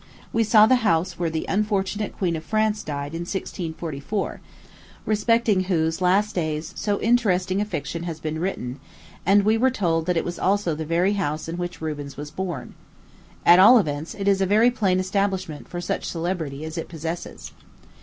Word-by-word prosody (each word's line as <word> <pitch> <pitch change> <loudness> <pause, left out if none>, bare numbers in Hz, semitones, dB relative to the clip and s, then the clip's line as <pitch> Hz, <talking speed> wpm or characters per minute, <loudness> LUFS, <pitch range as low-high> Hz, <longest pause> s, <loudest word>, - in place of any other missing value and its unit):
We 225 - +3
saw 215 0 +6
the 255 +3 +4
house 175 -6 0
where 170 -2 0
the 160 0 -3
unfortunate 205 0 -1
Queen 175 -4 0
of 160 - -5
France 215 +2 0
died, 145 0 -5
in 165 - -4
1644, 170 0 -4 0.6
respecting 215 -2 +2
whose 165 -2 0
last 200 +4 +2
days 155 -2 -2
so 205 -1 -1
interesting 195 -5 +2
a - - 0
fiction 170 -4 -4
has 165 -3 -5
been 155 0 -3
written; 140 -8 -3 0.5
and 200 +1 +5
we 220 +2 +3
were 260 +2 +4
told 170 -9 0
that 180 -1 +1
it - - 0
was 175 0 -5
also 195 -3 +1
the 155 +1 -4
very 175 +5 +2
house 155 -6 -2
in 165 +1 -4
which 175 -2 -5
Rubens 145 -3 -5
was 145 +1 -7
born. 175 -10 -5 0.7
At 175 +1 +8
all 220 +7 +9
events, 155 -5 -2
it 200 -1 -4
is 195 -1 +3
a 190 - +2
very 220 +5 +4
plain 195 -6 +1
establishment 185 -4 -2
for 175 - -5
such 175 - -3
celebrity 165 -4 -3
as 160 +1 -5
it - - -6
possesses. 165 +1 -6
180 Hz, 185 wpm, -24 LUFS, 160-205 Hz, 0.7 s, all